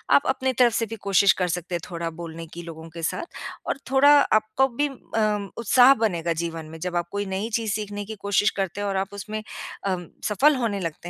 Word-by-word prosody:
आप - - +4
अपनी 260 0 0
तरफ 240 -2 +5
से 230 - +1
भी 225 - -6
कोशिश 195 0 +5
कर 180 - +2
सकते 175 +1 -3
हैं - - -1
थोड़ा 170 -1 -3
बोलने 165 0 -8
की 170 - -6
लोगों 165 -1 -9
के 165 +1 -9
साथ 335 - -3 0.3
और - - -1
थोड़ा 270 +2 +6 0.2
आपको 215 +5 +3
भी 270 +4 -1
अ, 215 -6 -2
उत्साह 245 +3 +6
बनेगा 175 -9 0
जीवन 165 -1 -4
में, 160 +1 -10
जब 180 +1 -4
आप 175 0 0
कोई 205 0 -2
नई 195 +3 -3
चीज़ 225 -2 -1
सीखने 205 -1 -4
की 220 +2 -7
कोशिश 200 +1 +3
करते 195 +1 -3
हो 205 - -1
और 195 -1 -1
आप 195 +1 -2
उसमें 210 +2 -5 0.5
अ, 190 -1 +1 0.3
सफल 275 +9 +4
होने 230 -6 -1
लगते 170 -1 -5
200 Hz, 220 wpm, -24 LUFS, 175-225 Hz, 0.5 s, थोड़ा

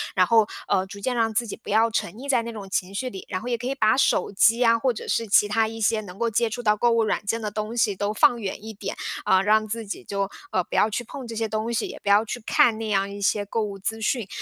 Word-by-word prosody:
然 185 - +5
后， 220 +1 +4 0.2
呃， 190 -1 +2
逐 200 0 -10
渐 255 +4 -1
让 225 -2 +1
自 235 +2 0
己 210 - -7
不 - - -12
要 225 +2 +3
沉 175 - -2
溺 270 +5 -9
在 255 -4 +3
那 235 0 -6
种 200 -3 -8
情 190 +1 -2
绪 255 +4 -2
里， 190 -5 -9
然 185 - -4
后 245 - -5
也 240 - 0
可 245 - -5
以 270 - -2
把 220 -2 +3
手 - - +2
机 225 +4 +4
呀， 230 -2 +4
或 255 +1 +1
者 - - -7
是 230 - 0
其 205 0 +4
它 220 +1 +2
一 225 +1 -7
些 220 0 +2
能 185 -3 -11
够 235 +2 0
接 230 +1 +1
触 245 +3 -5
到 210 -1 +3
购 240 +2 +3
物 230 -1 +3
软 215 -1 -1
件 230 +2 -1
的 210 -1 -3
东 215 +2 -4
西 210 -5 +1
都 205 +1 -1
放 235 +2 +4
远 200 -1 -5
一 220 - -7
点， 200 - -5 0.3
呃， 190 - +4
让 215 +1 +3
自 225 +1 -4
己 200 - -7
就， 200 -1 -2 0.2
啊， 185 - +1
不 - - -7
要 215 - +4
去 220 +3 -3
碰 250 +2 -8
这 230 - -7
些 220 -1 -2
东 220 +2 -2
西， - - -2
不 - - -13
要 205 +2 +5
去 235 +2 -5
看 225 0 +3
那 225 - -3
样 195 -1 +1
一 200 - -8
些 205 +1 +1
购 225 +2 -1
物 200 -2 -5
资 225 +3 -3
讯， 220 -1 -1
220 Hz, 320 characters per minute, -24 LUFS, 205-230 Hz, 0.3 s, 然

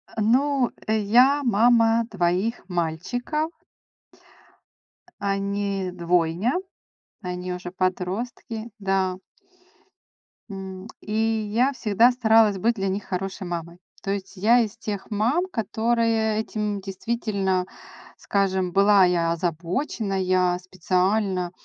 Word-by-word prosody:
А, 220 - -2
ну, 230 +6 +4 0.5
э, - - +3 0.2
я 250 +2 +9 0.3
мама 230 0 +4
2 190 +5 0
мальчиков. 180 - -2 1.7
Они 200 -1 -1
двойня, 175 +5 +1 0.7
они 180 0 -4
уже 180 0 -6
подростки. 200 +5 -3
Да. 190 -2 0 1.3
М, 190 0 -7
и 210 - -9
я 225 +3 +1
всегда 230 0 +3
старалась 225 -4 +4
быть 230 +5 +2
для 195 -2 -2
них 195 +2 -2
хорошей 190 +1 -4
мамой. 170 0 -5 0.3
То 195 - -2
есть 200 0 -5
я 225 +6 +5
из 220 -3 -1
тех 205 -2 -5
мам, 235 - +1
которые 225 - 0
этим 210 -2 -2
действительно, 195 -1 -2 0.5
скажем, 190 -2 0
была 200 +1 +5
я 170 -2 +1
озабоченная, 180 - 0
специально 185 +1 0
200 Hz, 105 wpm, -24 LUFS, 185-225 Hz, 1.7 s, я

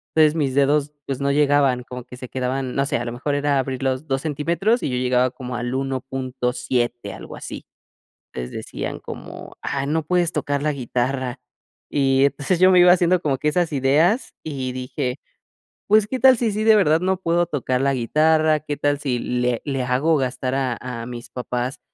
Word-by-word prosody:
Entonces, 155 -1 +5
mis 140 -5 0
dedos, 145 +1 +2
pues, 135 -2 -3
no 140 0 +1
llegaban, 140 -3 +3
como 125 0 -8
que 125 - -11
se 125 0 -8
quedaban, 130 0 -2
no 140 - +1
sé, 140 - 0
a 120 - -4
lo 120 - -3
mejor 140 +4 -2
era 145 0 +1
abrirlos 130 +2 -2
2 135 -1 -1
centímetros 170 - 0
y - - 0
yo 125 - -1
llegaba 125 0 +2
como 125 -1 -7
al 120 +1 -3
1.7, 125 -4 -2
algo - - -9
así. - - -8 0.7
Les 60 -1 -5
decían - - -5
como: - - -9
"Ah, 135 0 -2
no 160 +2 +1
puedes 175 +1 +1
tocar 145 -2 -1
la 150 0 +1
guitarra". 130 0 -2 0.5
Y 135 -1 +3
entonces, 145 +5 0
yo 185 +1 +6
me 180 - +6
iba 175 0 +8
haciendo 180 0 +2
como 140 -5 0
que 150 - +1
esas 175 +1 0
ideas 150 - +2
y 135 -4 -4
dije: 130 +1 -3 0.7
"Pues, 210 0 +4
¿qué 255 +3 -3
tal 260 0 +7
si, 230 -2 0
sí 215 +1 -1
de 220 0 +6
verdad 160 -4 +3
no 190 +1 +1
puedo 175 -1 +1
tocar 130 -5 -1
la 140 0 +2
guitarra? 155 +5 +2
¿Qué 145 -1 -4
tal 145 0 +1
si 130 -4 -1
le 125 -1 -1
le 135 -3 -1
hago 130 +6 +2
gastar 130 -1 -2
a 130 -3 -1
a 120 -2 -5
mis 120 -1 -8
papás, 125 +2 -4
135 Hz, 195 wpm, -22 LUFS, 125-155 Hz, 0.7 s, iba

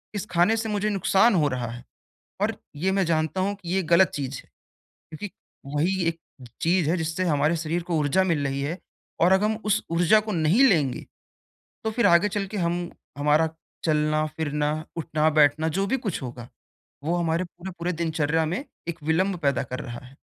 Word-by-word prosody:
इस 205 - -3
खाने 180 +6 +4
से 225 0 -2
मुझे 210 0 0
नुकसान 200 +2 +3
हो 155 -4 +3
रहा 125 -3 -2
है। 120 +1 -9 0.6
और - - +1 0.2
ये 180 +6 0
मैं 195 0 +2
जानता 160 +2 0
हूँ 200 +2 0
कि 195 -4 -10
ये 190 - +2
गलत 185 +2 +7
चीज़ 140 -1 -3
है - - -29 0.6
क्योंकि 190 +6 -6 0.4
वही 180 +6 +1
एक 165 0 -2 0.4
चीज़ 170 -2 +2
है 175 - +2
जिससे 165 +2 -2
हमारे 155 0 +2
शरीर 165 +2 -2
को 170 - 0
ऊर्जा 150 +5 +2
मिल 165 -6 0
रही 135 0 -2
है 160 +6 -3 0.4
और 175 +3 +5
अगर 190 +2 +4
हम 215 0 +1
उस - - +2
ऊर्जा 175 +5 +4
को - - 0
नहीं 170 - +3
लेंगे, 145 - +1 0.8
तो 220 - 0
फ़िर 235 +2 +2
आगे 170 +4 +5
चल 205 -1 -2
के 205 +2 -7
हम 175 0 0 0.4
हमारा 150 +2 +3 0.4
चलना-फिरना, 150 -1 0 0.2
उठना-बैठना 155 -1 +2
जो 195 - +1
भी 250 +7 +1
कुछ 185 - -2
होगा, 120 -2 -7 0.6
वो 165 +3 0
हमारे 170 0 0
पूरे-पूरे 175 0 -5
दिनचर्या 160 0 +1
में 180 - -3 0.2
एक 170 -2 -5
विलंब 180 +5 +1
पैदा 140 -2 +2
कर 130 - -3
रहा 120 0 -8
है 135 - -17
165 Hz, 185 wpm, -25 LUFS, 150-190 Hz, 0.8 s, गलत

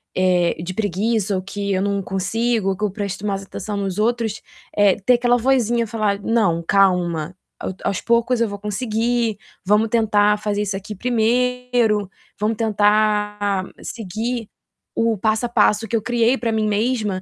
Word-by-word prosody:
eh, 180 -2 +2
de 185 +1 -4
preguiça 205 +1 0
ou 185 - -1
que 200 +1 -3
eu 185 - 0
não 200 0 0
consigo 205 +3 -1
ou 190 - -1
que 210 - -5
eu 200 - -1
presto 200 0 -4
mais 195 -1 -2
atenção 205 +1 -6
nos 195 -1 -3
outros, 225 -1 0 0.3
eh, 205 -2 +4
ter 250 - +6
aquela 245 0 +3
vozinha 240 -2 +2
falar: 210 -2 -1
"Não, 200 -8 +1
calma, 180 -4 +2 0.2
ao - - -4
aos 195 - -1
poucos 235 +1 +2
eu 230 - +3
vou 205 0 -6
conseguir. 225 +1 -1 0.3
Vamos 210 +3 +3
tentar 210 -2 +3
fazer 210 -1 -1
isso 200 -1 -2
aqui 210 +2 -7
primeiro 245 -2 +1 0.3
vamos 215 +1 0
tentar 210 -2 +1 0.2
seguir 225 +2 -4 0.5
o 230 -2 +1
passo 220 +4 +1
a - - -3
passo 220 -1 +2
que 230 - -2
eu 220 - +1
criei 240 +2 +2
para 230 -2 -1
mim 215 -1 0
mesma, 210 -3 0
210 Hz, 165 wpm, -21 LUFS, 200-230 Hz, 0.5 s, ter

